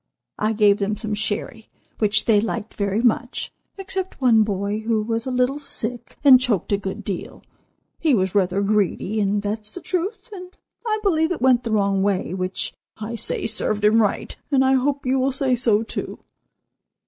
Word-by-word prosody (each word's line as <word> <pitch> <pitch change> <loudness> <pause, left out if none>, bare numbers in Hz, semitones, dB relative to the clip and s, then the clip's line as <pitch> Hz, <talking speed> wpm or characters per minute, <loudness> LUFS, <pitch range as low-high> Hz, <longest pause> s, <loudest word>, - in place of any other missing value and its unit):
I 215 +1 +1
gave 210 -2 +4
them 210 +1 -1
some 215 0 -4
sherry, 215 +2 -3 0.3
which 210 -1 +3
they 210 -3 +4
liked 225 -1 -4
very 200 +2 -1
much, 245 +1 0 0.3
except 385 -1 -5
one 240 -4 +5
boy 205 0 -1
who 220 -1 0
was 225 +2 -2
a - - -2
little 250 +3 +1
sick 240 -4 -4
and 265 -3 +8
choked 235 -9 0
a 200 - +3
good 200 +2 -6
deal. 195 -3 -6 0.6
He 305 -5 +3
was 190 -3 0
rather 195 0 +1
greedy, 210 +1 0
and 205 0 0
that's 210 +1 -4
the 360 - -8
truth, 370 +6 -3
and 365 -1 -10 0.3
I 430 -1 +1
believe 320 -4 +2
it 355 - -2
went 250 -1 +3
the 230 - -3
wrong 200 -2 +2
way, 195 -3 0
which 185 0 -2 0.2
I 220 +2 -6
say 230 - -2
served 215 -1 0
him 220 +2 +5
right, 205 - -1
and 265 -2 +3
I 265 - +4
hope 275 +1 0
you 260 +1 +1
will 265 +1 +1
say 265 -1 +1
so 225 -3 +2
too. - - -5
220 Hz, 185 wpm, -22 LUFS, 205-260 Hz, 0.6 s, and